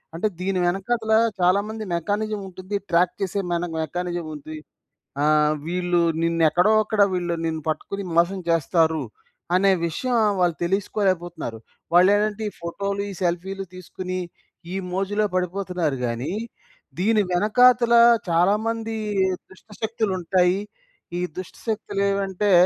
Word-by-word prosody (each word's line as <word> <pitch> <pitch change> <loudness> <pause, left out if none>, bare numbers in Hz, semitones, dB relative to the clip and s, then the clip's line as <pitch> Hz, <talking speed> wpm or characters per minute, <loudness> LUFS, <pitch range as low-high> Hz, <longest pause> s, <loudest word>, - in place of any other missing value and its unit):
అంటే, 175 +6 0
దీని 190 0 0
వెనక‌తలా 220 +4 +1 0.2
చాలా 180 +2 +4
మంది 220 0 -5
మెకానిజం 210 +5 -1
ఉంటుంది. 185 +2 -6
ట్రాక్ 175 +5 +3
చేసే 195 +1 -1
మన 170 0 0 0.2
మెకానిజం 175 +1 -3
ఉంది. 155 +2 -8 0.7
ఆహ్, 150 0 +4
వీళ్ళు 175 0 +1 0.2
నినేక్కడో 170 +4 +3
అక్కడ 215 -1 +2
వీళ్ళు 175 -2 -1
నిన్ను 160 -1 -2
పట్టుకుని 200 +5 -3
మోసం 175 +3 +3
చేస్తారు, 165 0 +2 0.5
అనే 195 +2 +4 0.2
విషయం 245 +9 -1 0.2
వాళ్ళు 175 -2 +2
తెలీసుకోలేకపోతున్నారు. 175 - -1 0.4
వాళ్ళేంటంటే 205 +4 +4
ఈ - - -9
ఫోటో‌లు, 200 +4 -3
ఈ - - -6
సెల్ఫీ‌లు 185 +3 -2
తీసుకొని 185 0 -5 0.5
ఈ - - -2 0.2
మోజులో 200 +3 0
పడిపోతున్నారు 180 -4 -1
గాని, 120 +7 -3 0.7
దీని 215 +2 +3
వెనకాతల 235 +5 +4 0.3
చాలా 175 +4 +4
మంది 225 0 -2 0.5
దుష్టశక్తులుంటాయి. 190 -3 -1 0.6
ఈ - - -1 0.2
దుష్టశక్తులేవంటే 200 0 -1
185 Hz, 110 wpm, -23 LUFS, 170-205 Hz, 0.7 s, చాలా